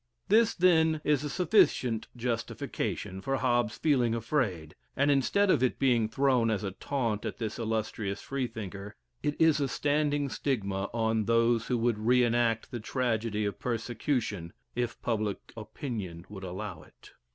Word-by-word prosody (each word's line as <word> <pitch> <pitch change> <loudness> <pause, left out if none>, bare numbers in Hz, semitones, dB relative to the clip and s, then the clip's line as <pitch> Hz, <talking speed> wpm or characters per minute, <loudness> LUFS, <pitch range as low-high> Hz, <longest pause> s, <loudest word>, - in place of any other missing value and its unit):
This, 225 +2 +4
then, 160 -3 +4
is 150 -2 +2
a 150 - -3
sufficient 135 - +2
justification 115 -5 -3
for 135 +6 -1
Hobbes 120 -4 +1
feeling 125 -7 +2
afraid, 110 - -1 0.2
and 140 +2 +4
instead 185 +9 +3
of - - +3
it 130 - +1
being 120 -5 +2
thrown 130 -2 +2
as 105 -3 -1
a 100 - -2
taunt 115 -1 -2
at - - -4
this 110 -1 -4
illustrious 110 -3 -2
Freethinker, 110 -6 -5 0.3
it 150 -1 -2
is 160 -2 +5
a 140 - +1
standing 145 +1 +1
stigma 100 -8 -2
on 110 -1 0
those 115 0 +2
who 125 - +1
would 115 -2 +1
re 125 +3 +4
enact 115 -1 +1
the 120 - -4
tragedy 115 -3 -1
of 100 - -3
persecution, 115 - -2 0.2
if 120 -1 -2
public 110 -3 -2
opinion 105 - -6
would 100 -2 -9
allow 95 -2 -6
it. - - -18
115 Hz, 150 wpm, -29 LUFS, 105-135 Hz, 0.3 s, is